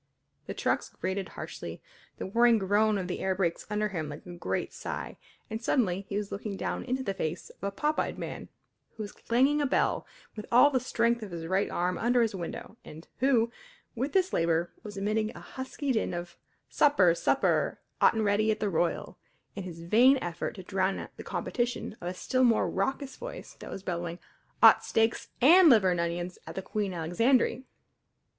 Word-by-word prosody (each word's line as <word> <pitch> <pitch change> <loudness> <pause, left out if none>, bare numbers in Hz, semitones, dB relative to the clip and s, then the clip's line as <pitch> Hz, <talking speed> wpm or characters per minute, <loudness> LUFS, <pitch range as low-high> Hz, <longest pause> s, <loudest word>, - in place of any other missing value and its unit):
The - - -5
trucks - - 0
grated 190 +1 -3
harshly, - - -7 0.4
the - - -4
whirring 235 +4 +4
groan 210 +2 +2
of 185 -2 -3
the 180 - -3
air 190 0 0
brakes 175 -3 -1
ran 210 - -3
under 210 0 +1
him 160 -6 -4
like 145 +1 -9
a 180 - -8
great 175 - -3
sigh, - - -5 0.3
and 220 0 -5
suddenly 200 -7 0
he 200 - -2
was 205 -1 -3
looking 200 0 -4
down - - -3
into 260 +1 -2
the 195 - -2
face 165 -2 -4
of - - -23
a 200 - 0
pop 300 +10 -1
eyed - - -1
man - - -6 0.5
who 220 - -5
was 205 - -7
clanging 270 +5 +2
a 285 - +2
bell, - - +1 0.3
with 210 - -7
all 250 +5 +7
the 260 - +2
strength 235 -1 +1
of 215 - -6
his 170 -2 -6
right 190 +4 +1
arm, 180 +1 -1
under 240 +1 +3
his 225 - -1
window, 190 +4 -6
and 160 +2 -12
who, 240 -3 +3 0.4
with 260 +5 -3
this 375 -1 +2
labour, 165 +1 +1
was 205 -2 -9
emitting 215 +2 0
a - - -8
husky 265 +1 -4
din 220 -7 0
of 175 0 -6 0.3
"Supper 195 - +4
supper - - +1 0.2
'ot - - +6
an' 220 - +1
ready 210 +1 +2
at 215 - +1
the 205 -2 -1
Royal" 170 0 -1 0.4
in 200 - -4
his 165 -2 -8
vain 245 +10 +5
effort 175 -8 -4
to 190 - -8
drown 190 +1 -1
the - - -9
competition 240 -3 -2
of 175 - -5
a 180 - -3
still 255 +7 0
more 235 -3 +4
raucous 270 +7 -2
voice - - -8
that - - -9
was 195 - -7
bellowing: 170 -2 -3 0.5
"'Ot - - +8
steaks 225 0 +1
an' 335 +6 +8
liver'n 190 -8 +5
onions 175 +1 -3
at - - -7
the 190 - -4
Queen 205 -1 -2
Alexandry!" 230 +10 +1
205 Hz, 195 wpm, -29 LUFS, 180-240 Hz, 0.5 s, Ot